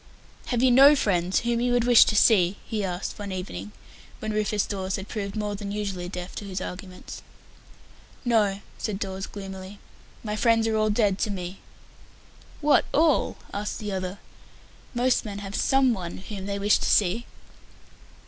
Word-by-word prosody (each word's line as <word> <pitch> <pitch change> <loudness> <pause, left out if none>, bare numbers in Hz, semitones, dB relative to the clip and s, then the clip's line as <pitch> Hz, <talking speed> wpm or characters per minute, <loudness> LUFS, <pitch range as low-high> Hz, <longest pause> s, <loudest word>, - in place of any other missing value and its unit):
"Have 245 -1 0
you 260 - +5
no 275 +4 +8
friends 185 -7 +1
whom 235 0 0
you 245 0 +1
would 245 -1 +3
wish 245 -1 +7
to - - 0
see?" 195 -4 +4
he 215 -3 -2
asked, 180 +1 -4
one 205 -1 -5
evening, 105 - -6 0.5
when 215 0 -4
Rufus 210 -1 0
Dawes 190 -2 -3
had 190 +1 -6
proved 200 -3 -4
more 210 -1 -2
than 200 0 -5
usually 195 -4 -3
deaf 180 0 -6
to - - -5
his 190 -1 -4
arguments. 180 0 -8 1.0
"No," 210 -4 +2 0.2
said 210 -3 -2
Dawes 190 -1 -4
gloomily. 195 0 -8 0.5
"My 210 -2 -3
friends 225 0 +3
are 220 - 0
all 215 0 +2
dead 205 -3 +2
to - - 0
me." 185 -1 -5 1.0
"What, 295 -1 +4
all?" 310 -1 +2 0.2
asked 205 +1 -3
the 210 -1 -5
other. 185 0 -3 0.8
"Most 250 +1 +2
men 205 -2 -6
have 200 -1 -7
some 270 -2 +3
one 175 -5 -5
whom 195 0 -7
they 200 0 -2
wish 205 +1 +3
to - - -1
see." 210 +4 +2
205 Hz, 170 wpm, -26 LUFS, 190-225 Hz, 1.0 s, no